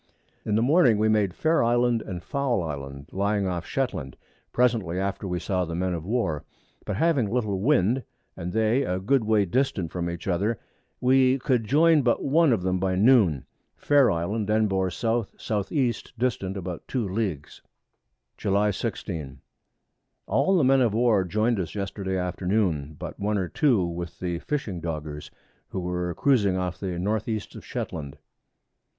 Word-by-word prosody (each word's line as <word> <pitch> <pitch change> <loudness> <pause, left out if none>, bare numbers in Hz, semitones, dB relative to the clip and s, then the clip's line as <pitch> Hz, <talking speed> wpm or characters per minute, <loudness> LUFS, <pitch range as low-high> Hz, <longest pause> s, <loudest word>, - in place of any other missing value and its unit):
In 105 - -1
the 110 - +3
Morning 130 -5 +5
we 110 +1 +2
made 105 -4 +2
Fair 160 -2 +2
Island 120 0 +2
and 90 -5 -6
Foul 135 -9 0
Island 70 -2 -6
lying 100 +1 0
off 90 -2 -2
of - - -12
Shetland, 100 - -2 0.3
presently 115 -8 +1
after 100 0 -2
we 90 -1 -2
saw 95 -1 -1
the 85 -1 -4
Men 90 +1 -1
of 85 0 -5
War; 105 -10 -1 0.4
but 105 - -2
having 140 - +2
little 110 -5 -1
Wind, 125 0 +2 0.3
and 85 +1 -5
they 110 +5 +2
a 90 -8 -1
good 120 +7 +1
way 105 -2 +3
distant 95 - 0
from 85 -1 -2
each 85 +1 -6
other, 100 +5 0 0.4
we 130 +1 +4
could 125 -4 0
join 155 +5 +4
but 120 -2 +1
one 155 +1 +4
of 105 -6 +1
them 95 0 0
by 95 0 0
Noon. 100 - +4 0.3
Fair 145 -3 +4
Island 100 +6 -1
then 110 0 +3
bore 95 -2 0
S.S.E. 115 - -1 0.2
distant 105 -6 -1
about 90 -2 -6
2 120 -6 -1
Leagues. 95 -7 -3 0.8
July 100 +1 +2
16. 80 - -5 0.9
All 190 0 +2
the 160 - +3
Men 135 +1 +4
of 115 -4 +2
War 115 -4 +3
join'd 110 +5 0
us 85 -1 -4
Yesterday 100 -1 -3
Afternoon, 90 -4 -1
but - - -7
one 105 +1 0
or 95 -2 -1
two 125 - +2
with 85 0 -5
the 85 -2 -3
fishing 105 - -3
Doggers, 75 -2 -5 0.4
who 95 - -4
were 90 -1 -2
cruizing 105 -9 +2
off 90 -2 -3
to 100 - -4
the 90 -2 -3
North 105 +4 -1
East 110 -2 -3
of - - -10
Shetland. 75 -2 -5
100 Hz, 170 wpm, -26 LUFS, 90-120 Hz, 0.9 s, Morning